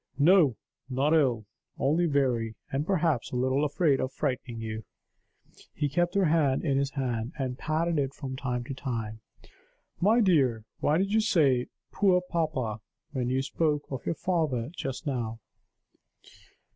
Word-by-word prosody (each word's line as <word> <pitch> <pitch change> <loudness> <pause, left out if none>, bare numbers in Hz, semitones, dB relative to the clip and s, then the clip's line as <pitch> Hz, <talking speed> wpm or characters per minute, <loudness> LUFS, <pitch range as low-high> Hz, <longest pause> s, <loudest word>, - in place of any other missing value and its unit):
"No; 155 - +5 0.3
not 135 +4 +1
ill. 125 -9 +2 0.3
Only 160 +6 +2
weary, 125 -6 +1 0.2
and 140 +3 -1
perhaps 165 -9 +1
a - - -6
little 130 +3 +1
afraid 150 -1 +2
of 130 - -1
frightening 130 -4 -3
you." 110 0 -5 0.9
He 145 -1 0
kept 175 +5 0
her 195 -2 +4
hand 150 -4 +2
in 135 -3 +2
his 140 0 0
hand, 125 -3 -2
and 130 -3 -2
patted 160 +1 0
it 135 -1 -1
from 130 -2 -5
time 125 -2 -2
to 130 - -6
time. 115 -5 -4 0.8
"My 215 +6 +4
dear, 135 - +3
why 150 - +2
did 195 +2 0
you 220 - +4
say 140 - +3 0.2
'poor 190 -3 +3
papa,' 155 -11 -2 0.3
when 125 -3 -1
you 130 +1 +1
spoke 150 +1 0
of 135 - -4
your 165 - 0
father 155 -9 -1
just 135 +1 -5
now?" 115 -5 -2
140 Hz, 155 wpm, -28 LUFS, 125-160 Hz, 0.9 s, No